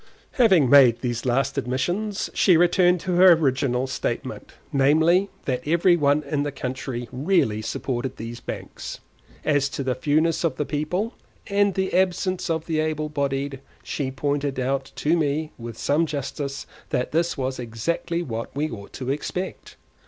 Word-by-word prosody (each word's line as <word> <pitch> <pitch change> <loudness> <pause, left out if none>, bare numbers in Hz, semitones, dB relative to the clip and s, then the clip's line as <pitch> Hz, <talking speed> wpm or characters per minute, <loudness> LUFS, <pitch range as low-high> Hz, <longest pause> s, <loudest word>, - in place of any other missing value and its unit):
Having 190 - +4
made 125 -3 +6
these 120 0 -2
last 135 +2 +1
admissions, 175 - -2
she 180 -4 +5
returned 175 +1 +4
to 180 -2 -1
her 185 0 +9
original 130 -5 +1
statement, 130 - -4 0.2
namely, 160 +8 +4 0.2
that 125 -2 -1
every 170 +3 +4
one 145 -1 +2
in 145 0 -1
the 145 0 -2
country 130 -2 -4
really 130 - +1
supported 120 +3 -3
these 115 +1 -6
banks. - - -7 0.5
As 145 -2 +2
to 140 - -4
the 130 -1 0
fewness 155 +5 +1
of 160 -6 +1
the 150 - -2
people, 180 - -2 0.3
and 200 -1 +2
the 190 0 -1
absence 185 0 +1
of 160 -1 -1
the 160 -2 -1
able 155 -1 -1
bodied, 140 -1 -2 0.2
she 140 -3 -3
pointed 140 0 -2
out 135 +1 -1
to 155 +3 +1
me 155 -1 0
with 115 -1 -7
some 155 +7 +1
justice 140 -1 -4 0.2
that 125 - -1
this 165 +1 0
was 130 -1 -2
exactly 145 +9 -2
what 115 -4 -5
we 150 +2 -1
ought 100 -3 -9
to 130 0 -3
expect. 180 +6 -4
145 Hz, 160 wpm, -24 LUFS, 130-170 Hz, 0.5 s, her